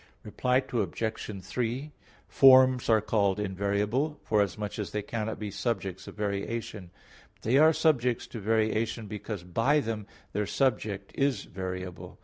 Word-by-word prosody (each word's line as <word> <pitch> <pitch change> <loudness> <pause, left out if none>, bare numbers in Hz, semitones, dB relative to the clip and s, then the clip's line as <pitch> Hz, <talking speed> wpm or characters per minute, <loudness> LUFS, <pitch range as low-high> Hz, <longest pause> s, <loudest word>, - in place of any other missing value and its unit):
Reply 125 +4 +1
Obj. 110 -4 -2
3: 125 +7 -3 0.4
Forms 130 -2 +6
are 110 -1 +5
called 100 -2 +1
invariable, 105 +9 -1
forasmuch 105 0 0
as 105 - -3
they 105 -1 -3
cannot 110 +1 -3
be 105 -1 -5
subjects 100 -3 -3
of - - -9
variation; 105 -1 -3 0.5
but - - -30
they 125 +5 +3
are 155 +1 +7
subject 145 -7 +1
to 115 - -5
variation 110 +1 0
because 105 -2 -6
by 115 - +2
them 110 -5 -4 0.3
their 105 -1 -1
subject 105 -7 -1
is 140 -1 0
variable. 90 -1 -6
110 Hz, 135 wpm, -29 LUFS, 100-125 Hz, 0.5 s, are